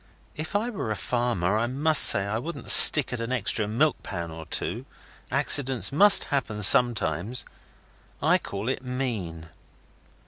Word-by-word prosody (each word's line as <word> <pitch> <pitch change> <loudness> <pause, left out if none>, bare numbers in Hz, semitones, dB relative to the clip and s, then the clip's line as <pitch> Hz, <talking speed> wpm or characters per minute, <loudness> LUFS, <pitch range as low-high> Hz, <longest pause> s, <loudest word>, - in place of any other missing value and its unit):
If 160 +6 -11
I 225 +4 -5
were 190 - -9
a 110 - -6
farmer, 115 -6 -6
I 120 - -5
must 150 +5 0
say 100 - +3
I 105 +2 -7
wouldn't 165 +8 -5
stick 145 -4 +9
at 125 - -8
an 115 +2 -9
extra 110 -3 -5
milk 140 +8 -4
pan 85 -1 -11
or 80 0 -14
two. - - -7 0.4
Accidents 135 -5 0
must 200 +8 +3
happen 110 -6 -6
sometimes. 115 0 -1 0.7
I - - -2
call 100 +3 -11
it 130 0 -7
mean. 110 -11 -9
120 Hz, 150 wpm, -21 LUFS, 100-135 Hz, 0.7 s, stick